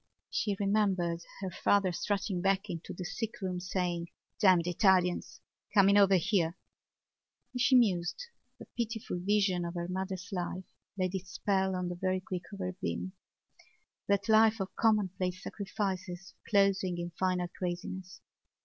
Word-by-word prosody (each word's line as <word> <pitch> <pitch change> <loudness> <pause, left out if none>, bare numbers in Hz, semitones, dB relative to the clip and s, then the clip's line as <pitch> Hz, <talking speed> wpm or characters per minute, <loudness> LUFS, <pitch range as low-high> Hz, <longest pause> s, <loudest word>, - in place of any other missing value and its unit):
She 205 -2 0
remembered 195 -5 +1 0.2
her 190 -2 -3
father 195 +1 +2
strutting 195 0 -1
back 195 +1 +1
into 170 -1 -6
the 180 - -6
sickroom 190 -4 -3
saying: 180 -2 -2 0.3
"Damned 185 -5 +5
Italians! 180 0 +2 0.3
coming 200 0 +6
over 200 -1 +6
here!" 180 -2 +1 1.0
As 250 - -2
she 260 +1 +5
mused 190 - +2 0.3
the - - -11
pitiful 225 -5 -3
vision 195 -1 +2
of 170 +1 -4
her 170 0 -3
mother's 190 +1 -4
life 185 0 -3 0.3
laid 185 -1 0
its 190 -1 -4
spell 190 0 0
on 180 -1 -2
the 175 - -3
very 185 0 +1
quick 185 -1 -5
of 200 - -7
her 185 -1 -3
being—that 190 +1 -5
life 220 0 +5
of 195 0 -4
commonplace 190 -4 +1
sacrifices 195 -2 -4 0.2
closing 195 -3 +3
in 175 0 -4
final 180 +1 0
craziness. 180 +1 -5
190 Hz, 140 wpm, -31 LUFS, 180-200 Hz, 1.0 s, coming